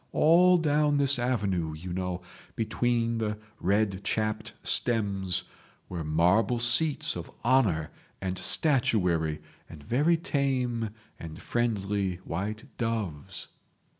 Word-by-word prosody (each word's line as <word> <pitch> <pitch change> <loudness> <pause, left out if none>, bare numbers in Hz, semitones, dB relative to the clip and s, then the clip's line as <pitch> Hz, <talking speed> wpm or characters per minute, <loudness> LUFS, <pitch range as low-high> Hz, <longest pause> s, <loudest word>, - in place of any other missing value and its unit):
All 180 +3 +6
down 150 -2 +2
this 140 -2 +4
avenue, 100 -10 0
you 85 +3 -6
know, 90 -1 -3 0.3
between 115 0 0
the 105 -1 -2 0.2
red 100 0 +1
chapped 110 +2 -1
stems, 100 -6 0 0.5
were 85 -3 -4
marble 90 +10 +2
seats 135 +6 +2
of - - -6 0.2
honour 105 - +2 0.3
and 95 -1 -3
statuary, 90 - +1 0.3
and 75 -3 -11
very 145 - +2
tame 130 -7 -1 0.3
and 80 -2 -8
friendly 100 -5 -1
white 105 +6 -3 0.2
doves 110 - -3
110 Hz, 105 wpm, -28 LUFS, 90-125 Hz, 0.5 s, All